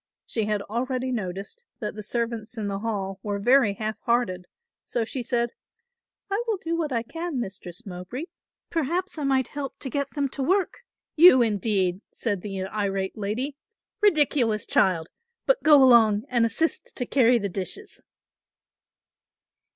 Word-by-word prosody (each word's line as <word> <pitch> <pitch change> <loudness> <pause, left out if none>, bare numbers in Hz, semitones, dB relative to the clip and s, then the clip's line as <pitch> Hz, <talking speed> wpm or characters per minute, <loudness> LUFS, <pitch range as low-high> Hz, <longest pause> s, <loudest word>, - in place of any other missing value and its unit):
She 220 -3 -1
had 210 -1 -1
already 255 +4 -2
noticed 200 - -4 0.2
that 210 -5 -3
the 210 - -7
servants 230 +1 -3
in 210 -2 -2
the 195 -1 -2
hall 200 -3 -3
were 205 -1 -2
very 230 0 +4
half 215 +1 -3
hearted, 210 -7 0 0.4
so 235 -2 -2
she 255 +3 -4
said, 240 0 0 0.8
"I 400 +4 -1
will 440 -3 +1
do 335 -2 -3
what 320 -3 -2
I 230 -2 0
can, 325 +2 -4
Mistress 190 -1 -7
Mowbray, 185 - -6 0.5
perhaps 335 +3 -1
I - - -2
might 265 -2 +2
help 285 -2 -5
to 265 - -5
get 280 -1 -1
them 285 -1 +1
to 275 - -4
work." 375 +7 +1 0.4
"You, 310 -6 +8
indeed," 200 -4 0
said 205 -6 -2
the 195 -1 -4
irate 195 -1 -2
lady, 225 +7 -3 0.5
"ridiculous 285 - +3
child! 170 -4 +2 0.4
but - - +3
go 295 -3 +7
along 220 -5 +6
and 235 -2 +3
assist 325 - -2
to 245 - -2
carry 245 -2 +4
the 205 -3 -2
dishes." 200 - -4
235 Hz, 155 wpm, -25 LUFS, 205-280 Hz, 0.8 s, You